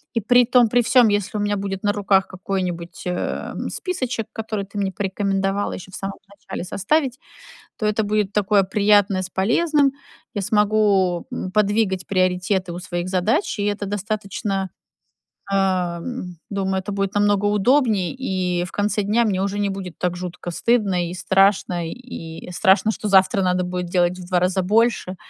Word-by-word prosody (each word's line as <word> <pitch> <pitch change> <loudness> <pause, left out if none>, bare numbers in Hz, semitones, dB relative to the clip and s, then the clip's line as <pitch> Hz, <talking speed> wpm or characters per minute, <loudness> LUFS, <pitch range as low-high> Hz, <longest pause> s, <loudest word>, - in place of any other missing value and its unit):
И 230 - +1
при 245 +3 +5
том 245 -2 +4
при 245 +1 +3
всём, 235 0 +5
если 205 0 -1
у - - -1
меня 205 0 0
будет 195 -1 -4
на 205 - +3
руках 195 -1 +2
какой-нибудь, 180 -3 -4
э, 180 - -3 0.2
списочек, 255 - -3
который 220 -2 -4
ты 200 +1 -10
мне 195 -1 0
порекомендовала 195 0 -1
ещё 185 +1 -9
в - - -9
самом 195 0 -5
начале 200 -3 -7
составить, 260 - 0 0.6
то 215 - -1
это 210 +1 +1
будет 210 -1 0
такое 205 -1 +3
приятное 200 -1 +3
с 185 - -6
полезным. 280 - +2 0.4
Я 205 - -2
смогу, 205 -4 +2
э, 185 - -4
подвигать 205 -3 +1
приоритеты 185 -1 0
у - - -5
своих 175 0 -4
задач, 195 - 0
и 205 - -1
это 205 0 -1
достаточно, 200 -1 -3 0.8
э, - - +2
м, 180 +1 -1
думаю, 190 -1 -1
это 205 +2 -6
будет 195 0 -2
намного 205 0 +2
удобнее, 210 -2 +2
и 185 -8 -1
в 180 - -8
конце 210 +1 0
дня 215 +4 +2
мне 195 -4 0
уже 200 +1 -2
не 200 -1 0
будет 190 -3 -6
так 180 -1 -1
жутко 180 -1 -6
стыдно 190 -3 +1
и - - -6
страшно, 190 -2 +2
и 170 -11 -9
страшно, 205 +4 +3
что 215 -1 -4
завтра 195 0 +4
надо 180 0 +1
будет 180 0 -3
делать 180 0 +1
в 180 - -8
2 180 -1 +2
раза 185 +1 +1
больше. 210 -2 +1
195 Hz, 170 wpm, -22 LUFS, 185-210 Hz, 0.8 s, при